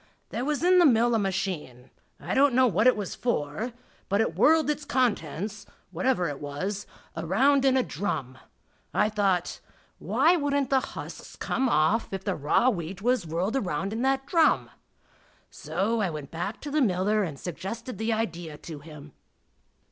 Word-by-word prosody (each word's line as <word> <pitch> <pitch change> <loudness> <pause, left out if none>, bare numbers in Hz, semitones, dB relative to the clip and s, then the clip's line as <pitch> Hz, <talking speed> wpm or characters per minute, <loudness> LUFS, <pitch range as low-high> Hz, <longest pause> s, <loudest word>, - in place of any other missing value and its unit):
There 240 - -3
was 295 +3 -1
in 365 +1 +6
the 350 - +6
mill 240 -1 +4
a 225 - +3
machine 180 - -3 0.3
I - - -4
don't 275 -1 +4
know 260 0 +5
what 215 0 +3
it 255 - +5
was 205 -3 -4
for 220 0 -2 0.4
but 200 - +2
it 225 - +1
whirled 315 0 +4
its 300 0 -1
contents, 210 - -1 0.2
whatever 185 +1 +1
it 145 -1 -5
was, 185 +8 -4 0.3
around 260 - +2
in 265 -1 +4
a 255 - +3
drum. 130 - -4 0.6
I 210 - +3
thought, 195 -4 0 0.4
"Why 345 - +3
wouldn't 285 -4 0
the 265 - +5
husks - - -8
come 265 -1 -1
off 205 +5 +2
if 195 -1 -4
the 195 -1 -1
raw 155 - +2
wheat 180 0 -6
was 245 -7 +1
whirled 175 +8 -1
around 190 - -2
in 225 - -2
that 270 +1 +1
drum?" 325 0 +3 0.8
So 225 +4 -1
back 205 - +1
I - - -3
went 165 +6 -5
to 295 - -5
the 305 +1 +2
miller 210 -1 +2
and 155 -8 -4
suggested 215 +8 -6
the 220 +1 0
idea 175 -8 -3
to 155 -2 -9
him. 150 -1 -12
210 Hz, 170 wpm, -27 LUFS, 170-255 Hz, 0.8 s, in